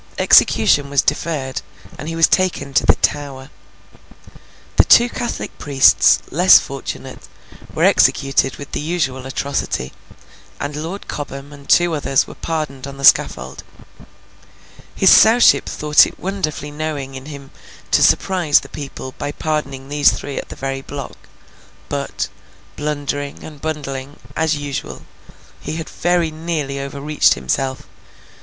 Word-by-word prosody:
Execution 145 Hz, -1 st, +4 dB
was 140 Hz, -1 st, +2 dB
deferred, 145 Hz, -3 st, -2 dB, 0.3 s
and 150 Hz, -, -8 dB
he 165 Hz, -, -4 dB
was 165 Hz, 0 st, +5 dB
taken 170 Hz, -7 st, 0 dB
to -, -, +2 dB
the -, -, +6 dB
Tower. 140 Hz, -2 st, -3 dB, 1.3 s
The -, -, +7 dB
two 240 Hz, -, +6 dB
Catholic 240 Hz, -, -5 dB
priests, 135 Hz, -3 st, +4 dB
less -, -, +7 dB
fortunate, -, -, -7 dB, 0.5 s
were -, -, 0 dB
executed 135 Hz, -1 st, +3 dB
with 145 Hz, -, -10 dB
the -, -, -3 dB
usual 145 Hz, -5 st, -2 dB
atrocity; 135 Hz, -, -3 dB, 0.7 s
and 145 Hz, +1 st, -4 dB
Lord 165 Hz, +7 st, -6 dB
Cobham 140 Hz, 0 st, -7 dB
and 140 Hz, -1 st, -15 dB
two 175 Hz, -1 st, +4 dB
others 135 Hz, -3 st, +1 dB
were -, -, -11 dB
pardoned 150 Hz, -5 st, -4 dB
on 140 Hz, 0 st, -9 dB
the 140 Hz, -, -9 dB
scaffold. 65 Hz, -, +3 dB, 1.3 s
His -, -, +5 dB
Sowship 225 Hz, +3 st, +6 dB
thought 150 Hz, 0 st, +4 dB
it -, -, -12 dB
wonderfully 155 Hz, -6 st, -4 dB
knowing 145 Hz, -3 st, -5 dB
in 130 Hz, +1 st, -9 dB
him 140 Hz, -2 st, -10 dB, 0.4 s
to -, -, +4 dB
surprise 175 Hz, -6 st, +3 dB
the 135 Hz, -, -13 dB
people 135 Hz, -2 st, -8 dB
by 145 Hz, -, -3 dB
pardoning 140 Hz, -4 st, -4 dB
these 145 Hz, 0 st, +3 dB
three 140 Hz, -, -5 dB
at -, -, -9 dB
the -, -, -8 dB
very 135 Hz, 0 st, -4 dB
block; 140 Hz, 0 st, -8 dB, 0.7 s
but, -, -, -3 dB, 0.5 s
blundering, 145 Hz, -1 st, -4 dB
and 150 Hz, -3 st, -11 dB
bungling, 145 Hz, -3 st, -5 dB, 0.2 s
as 160 Hz, -1 st, +1 dB
usual, 145 Hz, -2 st, -6 dB, 0.6 s
he -, -, -6 dB
had 160 Hz, -1 st, -5 dB
very 175 Hz, -2 st, 0 dB
nearly 155 Hz, -4 st, -4 dB
overreached 140 Hz, +2 st, +1 dB
himself. 130 Hz, -, -2 dB
145 Hz, 135 wpm, -18 LUFS, 135-155 Hz, 1.3 s, The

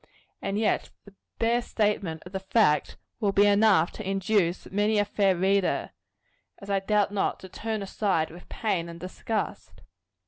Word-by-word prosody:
And 195 Hz, -, -2 dB
yet 215 Hz, -1 st, +1 dB, 0.2 s
the 200 Hz, -, -15 dB, 0.2 s
bare 235 Hz, +1 st, +2 dB
statement 205 Hz, -8 st, -1 dB
of 180 Hz, -, -10 dB
the 190 Hz, -, -3 dB
fact, 190 Hz, -5 st, +2 dB, 0.2 s
will 205 Hz, -4 st, +1 dB
be 200 Hz, +1 st, +4 dB
enough 200 Hz, -4 st, +4 dB
to 210 Hz, -3 st, -6 dB
induce 195 Hz, -2 st, +1 dB
many 210 Hz, +2 st, +2 dB
a 205 Hz, -, +3 dB
fair 200 Hz, -2 st, +2 dB
reader, 190 Hz, +2 st, +1 dB, 0.7 s
as 200 Hz, 0 st, -8 dB
I 195 Hz, -, +2 dB
doubt 205 Hz, +1 st, +1 dB
not, 205 Hz, -, -1 dB
to 190 Hz, -, -10 dB
turn 220 Hz, +1 st, -4 dB
aside 190 Hz, -5 st, 0 dB
with 175 Hz, +2 st, -13 dB
pain 185 Hz, -7 st, -1 dB
and 170 Hz, 0 st, -9 dB
disgust. 185 Hz, +5 st, -4 dB
200 Hz, 165 wpm, -27 LUFS, 185-210 Hz, 0.7 s, be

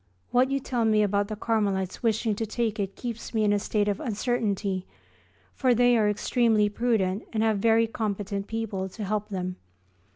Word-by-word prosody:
What 255 Hz, +2 st, +4 dB
you 275 Hz, 0 st, 0 dB
tell 245 Hz, -3 st, -1 dB
me 215 Hz, -1 st, +4 dB
about 205 Hz, 0 st, +1 dB
the 215 Hz, -, -4 dB
Carmelites 200 Hz, -4 st, -1 dB
wishing 220 Hz, -1 st, +1 dB
to 225 Hz, -, -2 dB
take 220 Hz, -1 st, -1 dB
it 195 Hz, -1 st, -2 dB
keeps 235 Hz, -1 st, -6 dB
me 220 Hz, -, +2 dB
in 205 Hz, -1 st, +3 dB
a 205 Hz, -, +2 dB
state 205 Hz, 0 st, 0 dB
of 205 Hz, -1 st, 0 dB
uncertainty, 205 Hz, -5 st, -1 dB, 0.7 s
for 255 Hz, -3 st, +2 dB
they 245 Hz, +1 st, +4 dB
are 215 Hz, -2 st, +3 dB
extremely 215 Hz, 0 st, +2 dB
prudent 210 Hz, -3 st, 0 dB
and 220 Hz, -1 st, 0 dB
have 220 Hz, -2 st, +2 dB
very 225 Hz, +2 st, +4 dB
competent 205 Hz, -3 st, -3 dB
people 205 Hz, -4 st, -3 dB
to 215 Hz, +3 st, -7 dB
help 210 Hz, +1 st, -2 dB
them. 185 Hz, -2 st, -4 dB
215 Hz, 185 wpm, -27 LUFS, 200-230 Hz, 0.7 s, What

